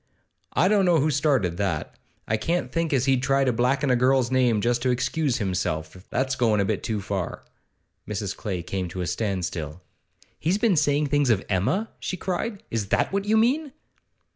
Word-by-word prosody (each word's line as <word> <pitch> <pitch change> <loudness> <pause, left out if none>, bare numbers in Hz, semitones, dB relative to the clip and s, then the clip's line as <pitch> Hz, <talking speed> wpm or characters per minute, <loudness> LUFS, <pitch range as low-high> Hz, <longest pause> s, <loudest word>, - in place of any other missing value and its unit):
I - - +3
don't 200 -1 +3
know 175 -2 +4
who 155 +2 +2
started 135 - +1
that. 95 -6 -2 0.3
I 110 - +1
can't 170 +11 -1
think 165 -1 -1
as 130 -3 +2
he'd 135 -2 +2
try 135 +1 +2
to 130 -2 +2
blacken 130 +4 +1
a - - +4
girl's 130 0 +2
name 125 -4 +3
just 120 +2 +1
to 130 - +1
excuse 130 +2 0
himself; 90 -7 -2
that's 130 0 0
goin' 115 -5 +2
a 100 - +2
bit 105 -1 -1
too 110 -2 -2
far.' 95 -3 -4 0.6
Mrs. 100 -2 -3
Clay 95 -6 -4
came 90 +1 -3
to 90 +2 -5
a - - -1
standstill. 90 -4 -3 0.6
'He's 175 +5 +1
been 215 -3 +2
saying 145 -1 +2
things 145 -2 +2
of 105 -4 +2
Emma?' 105 - +1
she 185 - -4
cried. 195 +4 -3
'Is 110 -3 -1
that 105 - +1
what 200 0 0
you 215 +1 +3
mean? 265 +6 +2
125 Hz, 190 wpm, -25 LUFS, 100-150 Hz, 0.6 s, know